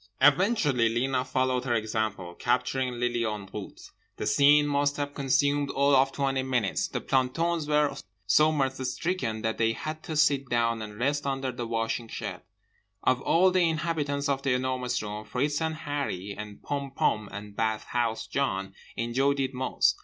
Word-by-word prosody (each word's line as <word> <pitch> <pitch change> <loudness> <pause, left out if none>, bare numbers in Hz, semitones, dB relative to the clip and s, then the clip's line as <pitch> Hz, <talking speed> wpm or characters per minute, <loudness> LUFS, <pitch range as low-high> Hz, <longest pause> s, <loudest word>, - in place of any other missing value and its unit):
Eventually 145 - +4
Lena 125 +3 0
followed 130 -1 0
her 120 -2 +1
example, 110 -5 -2
capturing 125 +3 0
Lily 120 -1 0
en 105 -3 -3
route. 105 -2 -8 0.3
The - - -3
scene 145 +1 +5
must 145 0 +1
have 145 0 -3
consumed 140 +1 +1
all 140 +1 +3
of 135 +1 +4
twenty 135 -1 0
minutes. 125 -6 0
The - - -4
plantons 150 +5 0
were 150 -1 +2 0.3
so 150 +10 +5
mirth 135 -3 -1
stricken 125 -5 -2
that 110 0 -1
they 115 0 +3
had 155 +5 -5
to 160 - -4
sit 140 -3 +3
down 115 -1 +1
and 105 -1 -7
rest 140 +4 0
under 135 -1 -1
the 120 -1 -5
washing 115 0 -2
shed. - - -6 0.6
Of 130 0 +2
all 185 +6 +4
the 180 -2 +3
inhabitants 155 -3 -1
of 135 -1 0
The 135 -2 +1
Enormous 125 -2 -1
Room, 105 0 -5
Fritz 145 +7 -1
and 160 0 -1
Harree 145 - -3
and 105 0 -9
Pom 140 -1 -3
Pom 105 -6 +1
and 105 0 -8
Bathhouse 110 +1 -1
John 95 -9 -2 0.2
enjoyed 135 +4 +1
it 135 0 -1
most. 130 +1 +1
130 Hz, 170 wpm, -28 LUFS, 115-145 Hz, 0.6 s, scene